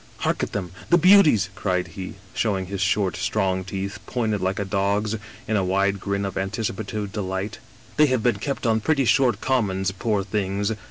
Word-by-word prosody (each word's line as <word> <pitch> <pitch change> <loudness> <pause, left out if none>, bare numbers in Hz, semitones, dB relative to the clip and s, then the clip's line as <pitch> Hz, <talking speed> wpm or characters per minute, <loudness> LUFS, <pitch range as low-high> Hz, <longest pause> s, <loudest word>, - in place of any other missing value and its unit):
" - - -26
* - - -25
Hark - - +1
at - - -2
them 90 -4 -4
— - - -17
^the 175 - +6
beauties! 155 - +6
' - - -24
cried 90 -3 -1
he, 95 +2 -7 0.2
showing 100 -4 0
his 95 +1 -4
short, 95 0 +1
strong 95 -3 0
teeth, 95 +1 -5
pointed 110 -4 -1
like 95 +1 0
a 100 - -1
dog's 100 +2 0 0.3
in 110 - 0
a 100 - +2
wide 100 +2 +1
grin 100 +1 -2
of 95 0 -3
anticipative 100 +1 -3
delight. 95 0 -3 0.2
* - - -25
They 150 0 +6
have 130 -4 0
been 120 -4 +2
kept 140 +4 -3
on 110 -1 +3
pretty 140 +2 +2
short 125 +2 +3
commons, 95 -7 +1
poor 100 +1 -1
things! 100 0 -1
100 Hz, 210 wpm, -24 LUFS, 95-110 Hz, 0.3 s, ^the